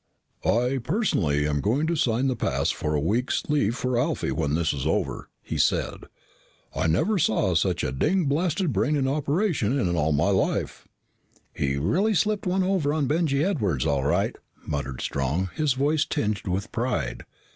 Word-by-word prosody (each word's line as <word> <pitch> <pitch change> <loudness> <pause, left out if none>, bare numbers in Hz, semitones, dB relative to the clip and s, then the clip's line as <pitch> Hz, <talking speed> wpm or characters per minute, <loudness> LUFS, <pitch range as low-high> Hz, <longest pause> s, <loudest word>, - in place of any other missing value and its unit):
"I, 125 +3 +1
personally, 115 - +1
am 75 -1 0
going 130 +9 +1
to 170 +1 0
sign 125 -3 +1
the 130 -2 +1
pass - - 0
for 75 0 -2
a - - +2
week's 110 - 0
leave 140 -7 +1
for 125 -2 0
Alfie 150 +5 -1
when 75 -2 0
this 80 -2 +1
is 70 -2 -3
over," - - -1
he - - -4
said. - - 0 0.7
"I - - 0
never 185 - +2
saw 105 - +2
such 85 +2 +1
a - - -1
ding 160 - +1
blasted 160 +2 0
brain 115 +10 +1
in 135 -2 +1
operation 145 - 0
in 90 -6 0
all 80 -1 +1
my 75 +1 +2
life." - - -1 0.7
"He 70 -1 -1
really 185 - +1
slipped 210 +3 +1
one 185 +1 +1
over 185 -6 +1
on 150 -1 0
Benjy 150 -1 +1
Edwards 100 - 0
all 70 -4 +1
right," 70 - +1 0.3
muttered 65 -3 -4
Strong, 70 +8 -1
his 155 -4 +1
voice 145 +4 +1
tinged 105 -8 -2
with 95 +5 -2
pride. 110 - -2
120 Hz, 175 wpm, -25 LUFS, -, 0.7 s, a